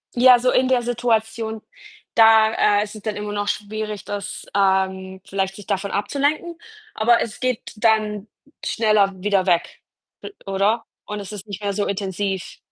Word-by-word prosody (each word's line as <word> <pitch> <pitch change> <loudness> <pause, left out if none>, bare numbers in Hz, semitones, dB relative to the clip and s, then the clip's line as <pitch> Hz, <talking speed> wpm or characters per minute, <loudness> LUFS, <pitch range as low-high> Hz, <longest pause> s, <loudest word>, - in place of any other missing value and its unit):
Ja, 250 0 +7
so 255 +1 +2
in 255 0 +3
der 255 -2 +3
Situation, 225 -2 -1 0.5
da, 220 -2 +5
äh, - - +2
ist 215 +1 -9
es 215 - -9
dann 215 -1 -3
immer 210 0 -4
noch 205 0 -2
schwierig, 210 0 -4
das, 205 0 -6
ähm 190 -1 +1
vielleicht 195 0 -2
sich 205 - -12
davon 200 -1 -2
abzulenken, 290 - -1 0.4
aber 235 +2 +3
es 215 - -4
geht 255 -3 -2
dann 215 -1 +1 0.4
schneller 215 -3 +2
wieder 200 -2 +1
weg, 175 -2 0 0.4
l 405 - -9
oder? 200 +4 +1 0.2
Und 210 0 -5
es 200 0 -8
ist 205 -1 -8
nicht 200 0 -7
mehr 200 -1 -1
so 205 0 -1
intensiv. 195 -1 -3
210 Hz, 165 wpm, -22 LUFS, 200-225 Hz, 0.5 s, Ja